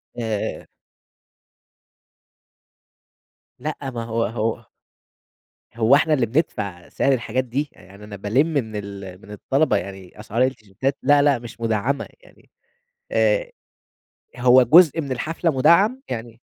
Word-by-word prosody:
آآ 110 -3 -3 2.9
لأ، 155 +3 -4
ما 115 -2 -5
هو 115 0 -1
هو 110 +1 -3 1.1
هو 115 +4 +5
إحنا 155 +1 +2
اللي 130 -5 +2
بندفع 105 - -2
سعر 140 - +1
الحاجات 125 0 -1
دي، 135 +4 -3
يعني 100 +3 -16
أنا 105 -1 -9
بالِمّ 110 - +1
من 140 -9 -2
ال 100 -2 -7
من 105 - -14
الطلبة 135 +9 +1
يعني 95 -1 -8
أسعار 110 +3 -1
التيشيرتات 130 +1 -2
لا، 145 0 +5
لا، 140 -3 +3
مش 120 0 -11
مدعّمة 115 +5 -1
يعني - - -22 0.6
آآ، - - +2 0.9
هو 125 +1 +6
جزء 165 +5 +6
من 140 -3 -6
الحفلة 165 +6 -1
مدعّم 190 - +3
يعني 115 -1 -6
120 Hz, 125 wpm, -22 LUFS, 105-145 Hz, 2.9 s, هو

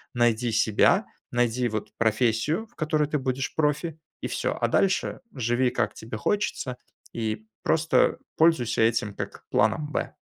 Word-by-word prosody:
найди 120 0 +2
себя, 110 -1 +3 0.3
найди, 120 0 +1
вот, 110 -1 -4
профессию, 115 - +1
в 240 - -30
которой 155 -1 +1
ты 150 0 -1
будешь 130 -1 -2
профи, 155 +1 0 0.2
и - - -2
всё. - - -2
А - - +2
дальше 190 -1 +1
живи, 125 0 +1
как - - -1
тебе 110 0 -7
хочется, 130 - -1 0.4
и 110 -1 -3 0.2
просто 160 +1 +3 0.2
пользуйся 155 -9 +3
этим 110 -2 +2
как - - -7
планом 145 +7 +2
Б. - - -3
125 Hz, 145 wpm, -26 LUFS, 115-150 Hz, 0.4 s, себя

